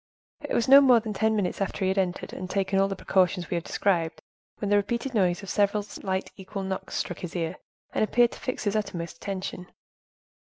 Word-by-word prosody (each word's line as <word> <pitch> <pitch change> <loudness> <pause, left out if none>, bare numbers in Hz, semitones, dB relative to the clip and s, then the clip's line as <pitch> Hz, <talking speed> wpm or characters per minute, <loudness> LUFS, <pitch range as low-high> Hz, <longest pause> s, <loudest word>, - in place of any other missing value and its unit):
It - - -3
was 235 - +2
not 275 +2 +10
more 255 -4 +6
than 215 -1 -5
ten 220 +2 +1
minutes 200 -2 -1
after 195 0 -1
he - - +2
had 190 - 0
entered, 180 -1 -2
and 185 0 -6
taken 195 0 +1
all 195 - +4
the 195 - -3
precautions 185 -2 +1
we - - +1
have 170 -1 -1
described, 170 -5 0 0.4
when 205 - -3
the - - +6
repeated 235 +6 0
noise 185 -3 +2
of 195 - -7
several 205 0 +2
slight 190 -2 -4
equal 195 0 -6
knocks 190 0 -4
struck 180 - -3
his 180 -1 -7
ear, 170 0 -2 0.4
and - - +2
appeared 240 +2 +3
to - - -10
fix 255 - -3
his 205 -1 0
utmost 175 -5 -3
attention. 185 -2 -5
195 Hz, 220 wpm, -27 LUFS, 185-210 Hz, 0.4 s, not